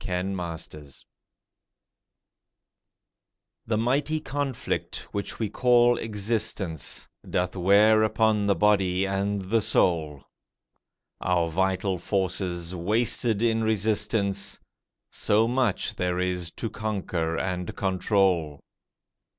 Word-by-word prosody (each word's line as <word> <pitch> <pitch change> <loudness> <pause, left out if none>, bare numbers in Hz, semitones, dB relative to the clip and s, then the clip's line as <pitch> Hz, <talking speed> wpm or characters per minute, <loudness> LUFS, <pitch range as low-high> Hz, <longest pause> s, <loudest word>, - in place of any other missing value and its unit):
RESPITE 85 -6 -5 2.6
The 110 -1 0
mighty 140 +7 0
conflict, 135 -3 -3
which 100 -1 -3
we 110 - -1
call 120 +1 +3
existence, 105 - -2 0.2
Doth 90 +1 -1
wear 100 +4 +5
upon 110 -1 +2
the 100 - +3
body 95 -3 +2
and 100 +1 -1
the 110 +4 +1
soul, 80 -8 +1 1.0
Our 85 -2 +1
vital 95 +1 0
forces 90 -2 -2
wasted 110 +4 +1
in 115 -1 +2
resistance, 105 -2 0 0.5
So 110 +2 +2
much 125 -4 0
there 90 0 -1
is 90 -2 -1
to 115 - -4
conquer 95 -7 -2
and 90 0 -3
control. 95 -5 +1
100 Hz, 95 wpm, -26 LUFS, 90-110 Hz, 2.6 s, wear